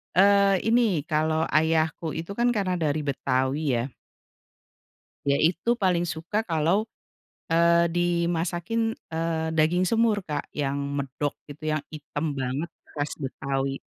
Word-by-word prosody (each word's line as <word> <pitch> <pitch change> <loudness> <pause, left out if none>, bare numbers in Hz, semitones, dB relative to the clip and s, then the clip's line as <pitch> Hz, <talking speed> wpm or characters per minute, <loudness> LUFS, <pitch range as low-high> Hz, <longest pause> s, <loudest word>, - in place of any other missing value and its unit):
eee, 200 0 +5
ini, 225 -9 +3
kalau 155 +1 +1
ayahku 160 0 +1
itu 165 +4 -5
kan 240 +4 +1
karena 185 -4 0
dari 150 -1 0
Betawi 135 +1 0
ya. 115 - 0 1.4
Dia 140 0 +2
itu 180 +9 +2
paling 180 -3 +2
suka 170 +6 -2
kalau, 170 +2 +1 0.7
eee, 170 +1 +4
dimasakin, 175 +5 0 0.2
eee, 160 0 -1
daging 175 +4 +3
semur, 225 -1 +2
Kak, 155 -5 -4
yang 140 -1 -1
medok 140 0 -2
itu 155 +2 -4
yang 155 - 0
item 150 -1 -4
banget 135 +5 -2 0.2
khas 145 0 -3
Betawi. 135 -1 -3
160 Hz, 125 wpm, -26 LUFS, 145-180 Hz, 1.4 s, eee